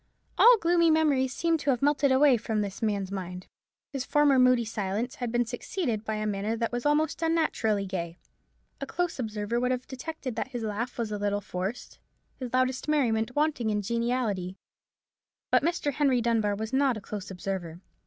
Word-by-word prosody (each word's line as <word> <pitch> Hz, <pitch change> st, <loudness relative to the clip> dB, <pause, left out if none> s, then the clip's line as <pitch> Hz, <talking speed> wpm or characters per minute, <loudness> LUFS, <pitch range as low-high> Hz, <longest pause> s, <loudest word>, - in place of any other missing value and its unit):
All 485 Hz, 0 st, +7 dB
gloomy 335 Hz, -2 st, +3 dB
memories 295 Hz, -5 st, +3 dB
seemed 330 Hz, +3 st, 0 dB
to 285 Hz, -, -2 dB
have 255 Hz, -1 st, +1 dB
melted 285 Hz, -1 st, +3 dB
away 265 Hz, 0 st, +5 dB
from 220 Hz, -2 st, -1 dB
this 200 Hz, -2 st, -5 dB
man's 200 Hz, -3 st, -1 dB
mind. 180 Hz, -2 st, -6 dB, 0.5 s
His 270 Hz, -2 st, -2 dB
former 290 Hz, -2 st, +3 dB
moody 255 Hz, -2 st, +4 dB
silence 215 Hz, +3 st, -3 dB
had 245 Hz, -2 st, -3 dB
been 240 Hz, 0 st, +1 dB
succeeded 240 Hz, -, -3 dB
by 220 Hz, -1 st, -2 dB
a 215 Hz, 0 st, -2 dB
manner 210 Hz, +2 st, -1 dB
that 230 Hz, 0 st, -1 dB
was 245 Hz, +3 st, -1 dB
almost 305 Hz, +2 st, +1 dB
unnaturally 315 Hz, -11 st, +1 dB
gay. 170 Hz, -3 st, -4 dB, 0.6 s
A -, -, -5 dB
close 350 Hz, -4 st, -2 dB
observer 220 Hz, 0 st, -2 dB
would 250 Hz, +1 st, 0 dB
have 255 Hz, 0 st, -1 dB
detected 265 Hz, -2 st, -6 dB
that 230 Hz, -, -1 dB
his 245 Hz, -3 st, -5 dB
laugh 220 Hz, +3 st, -3 dB
was 230 Hz, -3 st, -2 dB
a 210 Hz, -, -3 dB
little 205 Hz, 0 st, 0 dB
forced, 190 Hz, +3 st, -5 dB, 0.4 s
his 250 Hz, -3 st, -5 dB
loudest 255 Hz, +1 st, 0 dB
merriment 250 Hz, -6 st, +1 dB
wanting 295 Hz, -6 st, +1 dB
in 210 Hz, -1 st, 0 dB
geniality: 230 Hz, -5 st, -1 dB, 0.9 s
but -, -, +5 dB
Henry 290 Hz, -5 st, +1 dB
Dunbar 225 Hz, -3 st, +1 dB
was 220 Hz, +3 st, -5 dB
not 265 Hz, -3 st, +2 dB
a -, -, -5 dB
close 205 Hz, 0 st, -6 dB
observer. 180 Hz, -3 st, -5 dB
235 Hz, 180 wpm, -28 LUFS, 210-275 Hz, 0.9 s, All